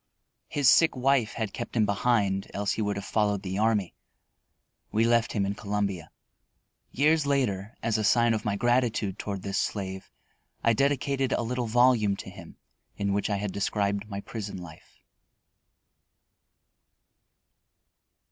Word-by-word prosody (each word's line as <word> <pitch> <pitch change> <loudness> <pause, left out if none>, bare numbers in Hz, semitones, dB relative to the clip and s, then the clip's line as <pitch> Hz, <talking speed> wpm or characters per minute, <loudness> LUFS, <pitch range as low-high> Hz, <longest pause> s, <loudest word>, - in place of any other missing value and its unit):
His 145 -3 +1
sick 165 +3 +6
wife 130 -3 +2
had 110 -3 -3
kept - - -6
him 110 -2 +3
behind, 100 -2 +1
else 100 0 0
he - - -2
would 105 -1 -1
have 100 0 -5
followed 105 -2 0
the 95 +1 -3
army. 105 -4 +1 1.0
We 110 - +2
left 115 0 +2
him 100 -3 0
in 100 - -1
Columbia. 100 -3 -3 0.8
Years 150 +1 +2
later, 115 -6 0
as 115 -1 +1
a - - -1
sign 120 +2 +4
of 110 -2 -2
my 105 -1 -1
gratitude 120 -4 0
toward 100 -3 -4
this 100 -1 -1
slave, 95 -2 -3 0.5
I 115 - +4
dedicated 135 +1 +1
a - - 0
little 125 +1 -2
volume 115 -3 +3
to - - -9
him, - - -12 0.4
in 100 -1 0
which 100 +1 0
I 100 - +1
had 100 0 -3
described 100 +1 -1
my 100 -1 -5
prison 105 -2 -6
life. 85 -4 -13
105 Hz, 145 wpm, -27 LUFS, 100-120 Hz, 1.0 s, sick